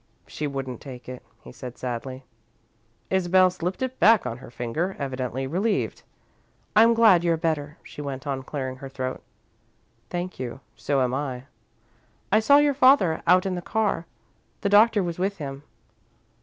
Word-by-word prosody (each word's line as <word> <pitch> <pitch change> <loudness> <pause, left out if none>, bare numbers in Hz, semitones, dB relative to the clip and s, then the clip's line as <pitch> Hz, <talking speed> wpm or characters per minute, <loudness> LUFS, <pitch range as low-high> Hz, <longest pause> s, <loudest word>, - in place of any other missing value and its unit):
"She 150 - -4
wouldn't 135 -3 -5
take 125 -3 -10
it," 130 0 -7 0.2
he 65 - -11
said, 125 - -9
sadly. 130 +1 -5 0.9
Isabel 185 0 +4
slipped 180 +5 -3
it 260 0 -4
back 220 - +5
on 120 -1 -4
her - - -11
finger, 125 +11 -3
evidently 130 -1 -3
relieved. 195 +10 -1 0.7
"I'm 230 +2 +6
glad 215 -7 +6
you're 170 -1 +2
better," 155 -2 -2
she - - -9
went 140 -1 -5
on, 135 -2 -2
clearing 130 -1 -5
her 135 +1 -8
throat. 130 -1 -4 0.9
"Thank 180 +1 -4
you. 125 0 -5 0.2
So 140 -1 0
am 125 0 -1
I." 130 -2 -3 0.9
"I 215 - +5
saw 280 +6 +6
your 290 0 +4
father, 255 - +4
out 180 +2 +5
in 190 - -1
the 175 - -3
car. 205 -4 -1 0.5
The 200 - 0
Doctor 210 0 +5
was 170 -1 -4
with 195 +2 -1
him." 140 -3 -6
160 Hz, 160 wpm, -25 LUFS, 130-190 Hz, 0.9 s, I'm